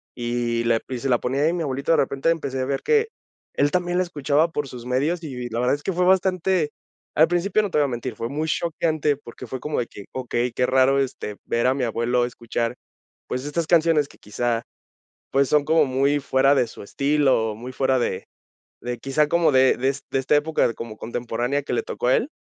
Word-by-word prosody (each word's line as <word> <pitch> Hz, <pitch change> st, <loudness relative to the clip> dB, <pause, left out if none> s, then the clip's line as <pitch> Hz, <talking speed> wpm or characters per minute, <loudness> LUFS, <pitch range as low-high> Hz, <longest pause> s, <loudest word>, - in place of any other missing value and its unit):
y 120 Hz, -1 st, -1 dB
la 115 Hz, -1 st, +3 dB
y 125 Hz, -2 st, -3 dB
se 135 Hz, -, -3 dB
la 120 Hz, -, +4 dB
ponía 135 Hz, +3 st, -1 dB
ahí, 165 Hz, -, +3 dB
mi 175 Hz, -2 st, -2 dB
abuelito 140 Hz, +2 st, -1 dB
de 165 Hz, -, +5 dB
repente, 135 Hz, +3 st, +1 dB
empecé 140 Hz, -5 st, -1 dB
a 130 Hz, -, 0 dB
ver 135 Hz, 0 st, -2 dB
que 450 Hz, 0 st, +3 dB, 0.5 s
él 145 Hz, +1 st, +2 dB
también 175 Hz, 0 st, 0 dB
la 185 Hz, -, +3 dB
escuchaba 155 Hz, -1 st, +1 dB
por 145 Hz, -3 st, -2 dB
sus 125 Hz, -1 st, -9 dB
medios, 150 Hz, +7 st, 0 dB
y 145 Hz, -4 st, -6 dB
v 125 Hz, -1 st, -4 dB
la 115 Hz, +1 st, -3 dB
verdad 125 Hz, +3 st, +2 dB
es 145 Hz, -, -11 dB
que 195 Hz, -, -1 dB
fue 180 Hz, +1 st, +1 dB
bastante 185 Hz, -3 st, +2 dB, 0.4 s
al 160 Hz, +2 st, +6 dB
principio 180 Hz, +5 st, +1 dB
no 205 Hz, -, -2 dB
te -, -, -1 dB
voy 145 Hz, -, +4 dB
a -, -, 0 dB
mentir, 120 Hz, -1 st, -4 dB
fue 115 Hz, -, -4 dB
muy 150 Hz, +5 st, -3 dB
choqueante 155 Hz, -2 st, 0 dB
porque 125 Hz, -2 st, -11 dB
fue 130 Hz, +2 st, -6 dB
como 150 Hz, -3 st, -2 dB
de 120 Hz, -, -2 dB
que: 100 Hz, -, -11 dB
"Okey, 125 Hz, -1 st, -2 dB
qué 125 Hz, +2 st, +1 dB
raro, 130 Hz, +1 st, +3 dB
este, 125 Hz, -6 st, -3 dB
ver 120 Hz, +2 st, +1 dB
a 130 Hz, -, +4 dB
mi 135 Hz, -2 st, -2 dB
abuelo 120 Hz, +2 st, +1 dB
escuchar, 120 Hz, 0 st, -3 dB, 0.5 s
pues, 130 Hz, +2 st, -3 dB
estas 155 Hz, +2 st, -2 dB
canciones 165 Hz, -3 st, +3 dB
que -, -, -19 dB
quizá, 115 Hz, +2 st, -2 dB, 0.7 s
pues 135 Hz, 0 st, +3 dB
son 150 Hz, -1 st, +3 dB
como 160 Hz, 0 st, +3 dB
muy 135 Hz, +2 st, +1 dB
fuera 135 Hz, 0 st, +3 dB
de 125 Hz, -3 st, +2 dB
su 110 Hz, -, -11 dB
estilo, 135 Hz, -4 st, +1 dB
muy 125 Hz, +3 st, -8 dB
fuera 130 Hz, 0 st, +1 dB
de 105 Hz, -, -2 dB, 0.6 s
de 120 Hz, 0 st, -4 dB
quizá 135 Hz, +4 st, +1 dB
como 165 Hz, 0 st, +3 dB
de 130 Hz, -1 st, +5 dB
des 135 Hz, +2 st, -1 dB
de 135 Hz, -, +1 dB
esta 135 Hz, +3 st, +2 dB
época 150 Hz, -4 st, +2 dB
como 110 Hz, -2 st, -7 dB
contemporánea 120 Hz, +4 st, -2 dB
que 135 Hz, -, -4 dB
le -, -, 0 dB
tocó 120 Hz, -, -3 dB
a 130 Hz, -, +5 dB
él". 255 Hz, -, 0 dB
135 Hz, 230 wpm, -23 LUFS, 120-155 Hz, 0.7 s, al